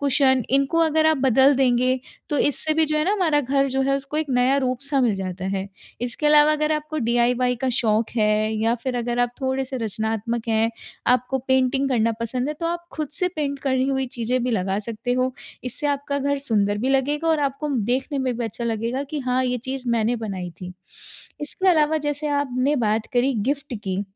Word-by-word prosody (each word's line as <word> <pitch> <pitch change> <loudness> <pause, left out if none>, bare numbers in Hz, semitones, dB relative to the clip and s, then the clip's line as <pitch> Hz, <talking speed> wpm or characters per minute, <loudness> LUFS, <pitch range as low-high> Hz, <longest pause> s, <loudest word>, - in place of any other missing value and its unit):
Cushion 265 -3 +3
इनको 275 +5 +2
अगर 315 -1 +3
आप 315 - +4
बदल 265 +3 +5
देंगे 255 0 +2 0.3
तो 295 - 0
इससे 305 +2 +1
भी 320 0 +3
जो 305 0 0
है 305 - +1
ना 390 - +2
हमारा 330 -8 +2
घर 275 +1 +1
जो 265 +1 0
है 275 +1 +2
उसको 275 +2 -6
एक 310 0 0
नया 255 +2 +3
रूप 255 -1 -1
सा 280 0 0
मिल 235 -5 +2
जाता 185 -1 -5
है। 195 +1 -4 0.3
इसके 245 +5 -2
अलावा 300 0 +6
अगर 305 0 +1
आपको 305 0 -3
डीआईवाई 245 +1 +2
का 260 - +2
शौक 220 -1 +1
है 215 0 +2
या 230 +1 +3
फिर 245 +1 -4
अगर 240 0 -2
आप 245 0 +1
थोड़े-से 265 0 -2
रचनात्मक 225 +1 -3
हैं, 225 +1 +2 0.4
आपको 255 +1 +2
पेंटिंग 260 +1 +2
करना 230 -2 +2
पसंद 250 +4 -2
है 300 - -2
तो 330 - -1
आप 345 0 -3
खुद 305 -3 -3
से 360 +1 0
पेंट 280 -2 -2
करनी 260 0 +2
हुई 265 -1 0
चीज़ें 245 +1 -2
भी 250 - 0
लगा 195 -3 0
सकते 230 +3 -4
हो। 255 +1 0 0.3
इससे 255 +4 -3
आपका 280 0 -1
घर 285 +1 0
सुंदर 205 -6 0
भी 250 +5 -1
लगेगा 290 +4 +1
और 320 -2 +2
आपको 280 +1 -1 0.2
देखने 265 +3 -1
में 255 -3 -1
भी 240 - -2
अच्छा 225 +2 -5
लगेगा 230 +3 -1
कि 295 +1 -5
हाँ 255 0 0
ये 250 0 0
चीज़ 265 0 -4
मैंने 225 +2 +1
बनाई 195 -6 -5
थी। 180 0 -7 0.7
इसके 335 +6 -1
अलावा 315 -2 +4
जैसे 295 0 -3
आपने 285 -1 0
बात 220 -2 0
करी 255 +2 +2
गिफ़्ट 270 +4 -2
की 190 +1 -1
260 Hz, 210 wpm, -23 LUFS, 235-285 Hz, 0.7 s, अलावा